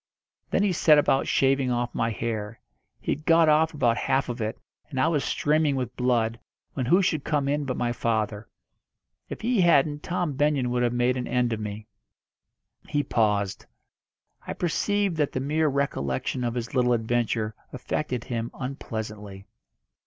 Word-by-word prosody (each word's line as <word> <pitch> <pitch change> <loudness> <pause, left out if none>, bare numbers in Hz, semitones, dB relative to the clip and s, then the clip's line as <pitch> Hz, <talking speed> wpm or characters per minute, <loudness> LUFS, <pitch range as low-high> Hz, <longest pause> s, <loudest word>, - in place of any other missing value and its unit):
Then 200 - +2
he 200 -3 +2
set 155 -2 +5
about 140 -2 +2
shaving 135 -1 +2
off 120 0 -1
my 115 - 0
hair. 110 -1 -4 0.4
He - - -3
had 150 - -3
got 165 0 +5
off 155 +1 +4
about 120 -6 +1
half 135 0 0
of 120 0 -4
it, 110 0 -2 0.3
and 135 -4 -4
I 130 - +3
was 150 -4 +1
streaming 150 -1 +1
with 125 -2 -3
blood, 120 -2 +1 0.3
when 130 -3 -2
who 180 +8 +4
should 155 -6 0
come 145 -3 0
in 145 +1 0
but 130 -2 -3
my 120 -1 0
father. 110 -2 -2 0.8
If - - -7
he 235 -2 +2
hadn't 150 -3 +3
Tom 175 -3 -2
Benyon 140 -3 +1
would 125 0 0
have 120 -1 +2
made 120 +1 +1
an 125 - -3
end 125 -1 +1
of 110 - -3
me." 105 0 -6 1.0
He 145 0 +1
paused. 105 -6 0 0.8
I - - -3
perceived 195 +1 0
that 150 -2 0
the - - -1
mere 155 +4 +1
recollection 130 - -1
of 120 0 -2
his 120 -1 -4
little 125 -2 +3
adventure 115 -1 0 0.2
affected 125 -1 -3
him 115 -1 -3
unpleasantly. 110 -6 -6
125 Hz, 170 wpm, -26 LUFS, 115-150 Hz, 1.0 s, set